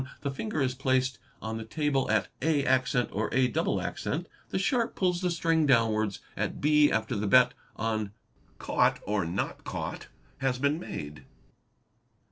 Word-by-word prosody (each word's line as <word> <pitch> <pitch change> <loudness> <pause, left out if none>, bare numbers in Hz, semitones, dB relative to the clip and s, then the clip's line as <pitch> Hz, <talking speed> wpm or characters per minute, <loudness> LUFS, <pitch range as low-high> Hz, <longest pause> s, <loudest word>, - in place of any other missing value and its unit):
The 140 - -2
finger 155 +1 -2
is 130 -1 0
placed 130 0 0 0.2
on 110 0 -3
the - - -5
table 140 +3 0
at 105 -1 +2
@' - - -37 0.7
or 105 +2 -1
a', 130 0 +3
the 160 - -1 0.3
sharp 230 +4 +1
pulls 180 -2 +1
the 180 - +1
string 165 -2 +2
downwards 110 -5 +2
at - - -2
0 150 0 +5
after 110 0 0
the 105 0 -1
bet 125 +3 +6 0.2
on 110 -2 -2 0.2
" - - -34
caught"' - - +2
or 105 -4 0
"not 85 +3 -3
caught" - - -5 0.3
has 135 -2 0
been 140 +4 +1
made. 75 - -7
130 Hz, 150 wpm, -29 LUFS, 110-150 Hz, 0.7 s, bet